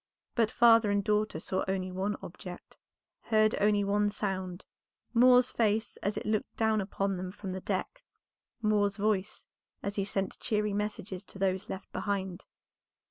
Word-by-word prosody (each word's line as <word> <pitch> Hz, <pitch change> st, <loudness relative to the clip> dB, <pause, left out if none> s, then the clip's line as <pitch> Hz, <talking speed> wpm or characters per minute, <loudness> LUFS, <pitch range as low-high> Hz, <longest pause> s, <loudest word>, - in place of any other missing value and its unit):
But 230 Hz, -3 st, +2 dB
father 230 Hz, -2 st, +6 dB
and 200 Hz, 0 st, +2 dB
daughter 210 Hz, -5 st, +1 dB
saw 190 Hz, +3 st, -1 dB
only 190 Hz, -1 st, -1 dB
one 195 Hz, +3 st, -2 dB
object, -, -, -9 dB, 0.4 s
heard 215 Hz, -1 st, +3 dB
only 205 Hz, 0 st, +4 dB
one 205 Hz, +1 st, +2 dB
sound, 190 Hz, -3 st, -3 dB, 0.5 s
Moor's 250 Hz, +1 st, +6 dB
face 220 Hz, -1 st, +1 dB
as 200 Hz, +2 st, -2 dB
it -, -, -4 dB
looked 215 Hz, 0 st, -1 dB
down 220 Hz, -1 st, +2 dB
upon 195 Hz, 0 st, -1 dB
them 180 Hz, 0 st, -4 dB
from 195 Hz, -1 st, -6 dB
the 190 Hz, 0 st, -4 dB
deck, 205 Hz, -, -3 dB, 0.6 s
Moor's 205 Hz, -1 st, +2 dB
voice 205 Hz, -2 st, -1 dB, 0.4 s
as 200 Hz, +1 st, -3 dB
he 200 Hz, -, +2 dB
sent 195 Hz, -1 st, -2 dB
cheery 210 Hz, -1 st, 0 dB
messages 205 Hz, -2 st, -3 dB
to -, -, -10 dB
those 190 Hz, -1 st, 0 dB
left 190 Hz, -, -6 dB
behind. 190 Hz, -3 st, -3 dB
205 Hz, 155 wpm, -30 LUFS, 190-215 Hz, 0.6 s, father